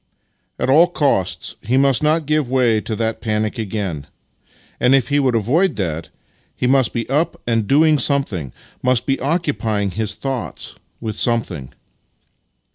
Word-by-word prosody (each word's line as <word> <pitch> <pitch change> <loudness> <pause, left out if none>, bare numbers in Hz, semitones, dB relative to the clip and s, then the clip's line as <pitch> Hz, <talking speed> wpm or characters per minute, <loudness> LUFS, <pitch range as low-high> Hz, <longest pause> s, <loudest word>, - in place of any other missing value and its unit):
At - - -1
all 155 +6 +6
costs 95 - 0
he 125 +5 0
must 135 -2 +3
not 155 +1 +2
give 150 -3 0
way 120 -4 +2
to 110 - -4
that 110 0 -2
panic 110 +1 -1
again; 95 -9 -4 0.7
and 125 +2 +4
if 130 -1 +1
he 145 0 +2
would 130 -4 +1
avoid 150 - +2
that, 85 -5 -3 0.5
he - - -2
must 130 0 +3
be 115 -1 -3
up 150 +5 0
and 115 -3 0
donig 150 +2 +4
something 110 - 0 0.2
— - - -30
must 125 -1 +2
be 135 -1 0
occupying 130 - -1
his 110 +2 -2
thoughts 135 -3 -4 0.3
with 110 -2 -5
something. 115 - 0
125 Hz, 155 wpm, -19 LUFS, 110-140 Hz, 0.7 s, all